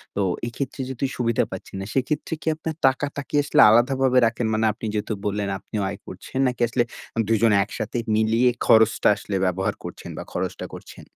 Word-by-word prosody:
তো 100 - 0 0.3
এক্ষেত্রে 130 +3 -5
যেহেতু 130 +1 -3
সুবিধা 115 -2 +1
পাচ্ছেন - - -8
না, - - -5
সেক্ষেত্রে 145 +4 -1
কি - - -11
আপনার 160 0 -5
টাকাটা 140 +2 -1
কি - - -3
আসলে 145 - +4
আলাদাভাবে 130 +3 +3
রাখেন? 115 +1 -2
মানে 110 +1 +1
আপনি 110 - -8
যেহেতু 105 +1 -2
বললেন 105 -1 -1
আপনিও 105 -2 -4
আয় 100 - -6
করছেন, 110 +8 -6
নাকি 125 -1 -3
আসলে 120 +1 +1 0.4
২ 115 - +2
জন 115 -1 +5
একসাথে 110 +3 -5 0.2
মিলিয়ে 115 +3 +3 0.2
খরচটা 110 0 +5
আসলে 100 - -5
ব্যবহার 95 +1 0
করছেন - - -8
বা - - -5
খরচটা - - -3
করছেন? - - -12
115 Hz, 180 wpm, -23 LUFS, 110-130 Hz, 0.4 s, জন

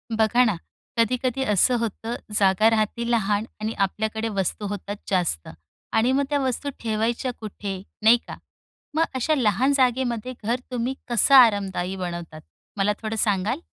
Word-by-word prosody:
बघा 225 +3 +4
ना, 215 -5 +1 0.4
कधी-कधी 250 +3 +1
असं 225 +2 +4
होतं, 230 +1 -3 0.2
जागा 200 +2 +4
राहती 225 +2 0
लहान 210 -2 +1 0.2
आणि 220 +1 -2
आपल्याकडे 220 +3 -3
वस्तू 200 0 -2
होतात 205 0 -5
जास्त 175 - 0 0.5
आणि 230 +3 +3
मग 275 +2 +2
त्या 290 -1 +1
वस्तू 265 +1 -1
ठेवायच्या 230 +3 -1
कुठे? 200 -3 -6 0.2
नाही 225 +2 +7
का? - - -8 0.6
मग 320 - +3
अशा 285 +5 +1
लहान 250 +2 +2
जागेमध्ये 250 -2 0
घर 235 +4 0
तुम्ही 250 +1 -1 0.2
कसं 240 +4 +5
आरामदायी 200 -6 +4
बनवतात, 175 -4 -6 0.4
मला 200 +1 +2
थोडं 220 0 -3
सांगाल? 210 - 0
220 Hz, 145 wpm, -24 LUFS, 200-245 Hz, 0.6 s, नाही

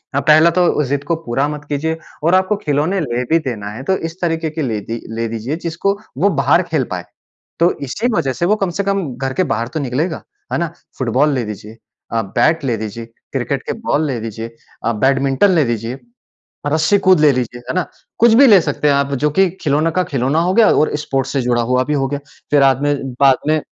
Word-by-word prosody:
अ, 140 - +3
पहला 155 +3 +5
तो 170 -4 +2
ज़िद 140 0 0
को 170 - 0
पूरा 135 +4 0
मत 150 -1 -6
कीजिए 160 +3 -1 0.3
और 170 +3 +4
आपको 190 +3 +2
खिलौने 155 +6 +1
ले 125 -4 -2
भी 165 - +5
देना 105 -3 -5
है 125 +5 -8
तो 190 +5 +1
इस 165 +2 -6
तरीके 165 -2 -1
के 155 +1 -5
ले 115 -6 -1
दि 115 +2 -6
ले 115 0 -1
दीजिए 115 +6 -4
जिसको 170 +4 0 0.2
वो 195 +8 +3
बाहर 170 - +3
खेल - - +2
पाएँ। - - -4 0.5
तो 170 +2 +4
इसी 215 - -2
वजह 135 -9 0
से 170 - -1
वो 210 +4 +3
कम 195 -3 -1
से 200 - 0
कम 195 0 0 0.2
घर 130 0 -3
के 185 - +1
बाहर 115 +1 -1
तो 160 - -1
निकलेगा, 145 +5 -2 0.3
है - - +1
ना? 170 - 0 0.3
फ़ुटबॉल 130 +4 +2
ले 125 -3 -1
दीजिए, 105 +1 -8 0.4
अ, 115 - +1 0.2
बैट 160 0 +3
ले 120 -3 +1
दीजिए, 110 +2 -6 0.3
क्रिकेट 135 +1 -1
के - - -3
बॉल 155 +2 +2
ले 125 -4 -2
दीजिए, 115 +1 -6 0.3
अ, 115 - +2
बैडमिंटन 135 +6 +3
ले 165 -4 +3
दीजिए, 120 +2 -3 0.7
रस्सी 160 +6 +2
कूद 185 -4 +6
ले 150 -2 +6
लीजिए, 120 -1 -3
है - - -2
ना? 185 - 0 0.3
कुछ 230 0 +5
भी 280 - +8
ले 200 -4 +7
सकते 150 - 0
हैं 140 - +4
आप 140 0 0
जो 150 - +3
कि 195 -1 +5
खिलौनों 155 +2 +1
का 185 - +1
खिलौना 135 +4 +1
हो 185 - +1
गया 225 -1 +6
और 155 - +2
स्पोर्ट्स 135 -1 -2
से 140 - 0
जुड़ा 120 -1 +1
हुआ 130 0 +3
भी 150 - -1
हो 135 -1 +1
गया। 145 +1 -3 0.3
फिर 145 -1 +4
आद 135 -1 +4
में 145 0 +2 0.2
बाद 135 -2 +5
में 155 0 +2
145 Hz, 230 wpm, -17 LUFS, 125-165 Hz, 0.7 s, भी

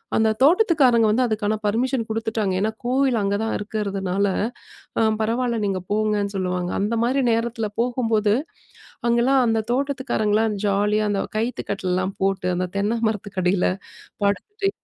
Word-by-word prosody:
அந்த 220 0 +3
தோட்டத்துக்காரங்க 280 - +5
வந்து 250 +4 +2
அதுக்கான 215 -1 0
பர்மிஷன் 235 +3 0
குடுத்துட்டாங்க. 220 -3 -1
ஏன்னா 215 +2 0
கோவில் 260 -1 +2
அங்க 200 0 0
தான் 225 - -1
இருக்கிறதுனால, 200 -2 -2 0.7
அ - - +3 0.2
பரவாயில்ல, 235 +1 0
நீங்க 195 -2 -1
போங்கன்னு 210 -1 0
சொல்லுவாங்க. 180 -1 -1
அந்தமாரி 230 +6 +1
நேரத்துல 230 -1 -1
போகும்போது, 225 -4 +1 0.7
அங்கேல்லாம் 245 +3 +3
அந்த 225 -1 +2
தோட்டத்துக்காரங்கள்லாம் 230 -6 0
ஜாலியா 210 +2 +2
அந்த 200 -1 0 0.2
கயித்து 235 +3 -2
கட்டில்லாம் 185 0 -1
போட்டு, 195 -2 0
அந்த 180 0 -1
தென்ன 215 +3 0
மரத்துக்கடில 190 -3 0 0.6
படுத்து, 395 - -1
220 Hz, 125 wpm, -22 LUFS, 200-240 Hz, 0.7 s, தோட்டத்துக்காரங்க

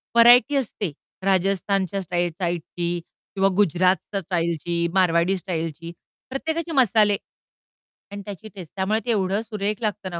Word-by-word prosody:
Variety 245 +4 +7
असते, 210 - -2 0.3
राजस्थानच्या 195 0 +1
स्टाई 175 0 -1
साइडची 175 0 -3 0.4
किंवा 195 0 +3
गुजरातच्या 190 +1 +2
स्टाईलची, 170 -1 -1
मारवाडी 180 0 +3
स्टाईलची. 165 -2 -4 0.4
प्रत्येकाचे 320 +5 -3
मसाले 215 -7 +4 0.9
आणि 200 0 -6
त्याची 210 +2 -8
टेस्ट. 180 -6 -9
त्यामुळे 205 +3 +1
ते 240 - +1
एवढं 200 -1 +1
सुरेख 210 -2 -3
लागतं 205 -3 -2
ना 170 - -4
195 Hz, 125 wpm, -23 LUFS, 175-210 Hz, 0.9 s, Variety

